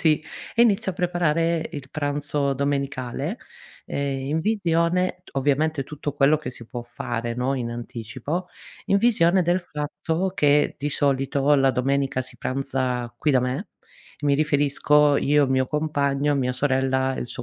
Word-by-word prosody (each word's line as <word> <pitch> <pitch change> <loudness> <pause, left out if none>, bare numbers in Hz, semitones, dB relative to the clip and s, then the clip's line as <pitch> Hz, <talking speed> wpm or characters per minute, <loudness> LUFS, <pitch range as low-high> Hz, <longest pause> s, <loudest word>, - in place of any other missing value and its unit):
sì, 155 -2 +3 0.3
e 235 - +5
inizio 200 -4 +2
a - - -14
preparare 170 -2 0
il 135 -3 -7
pranzo 145 -1 -1
domenicale, 140 - -2 0.5
ehm, 140 -1 -2
in 155 - 0
visione, 180 -2 +1
t - - -16
ovviamente 145 +2 +1
tutto 150 +1 -5
quello 145 +1 +4
che 145 -4 -6
si 120 -2 -11
può 120 +1 -6
fare, 120 0 -4
no, 125 +3 0
in 120 -3 -3
anticipo, 120 - -5 0.4
in 200 - +3
visione 190 -5 +4
del 175 +2 +1
fatto 160 +3 -3
che, 145 -3 +3
di 145 +1 -2
solito, 140 0 +1
la 135 -1 +4
domenica 135 +1 0
si 130 - -9
pranza 130 -2 -2
qui 150 - +2
da 130 - +4
me. 125 - -3 0.5
Mi 145 -1 +2
riferisco 145 0 +3
io, 145 0 +3
il 130 - -2
mio 130 -1 +2
compagno, 145 -1 0
mia 125 -2 0
sorella 130 0 +1
e - - -4
il - - -4
suo 120 +1 -7
145 Hz, 160 wpm, -24 LUFS, 130-155 Hz, 0.5 s, e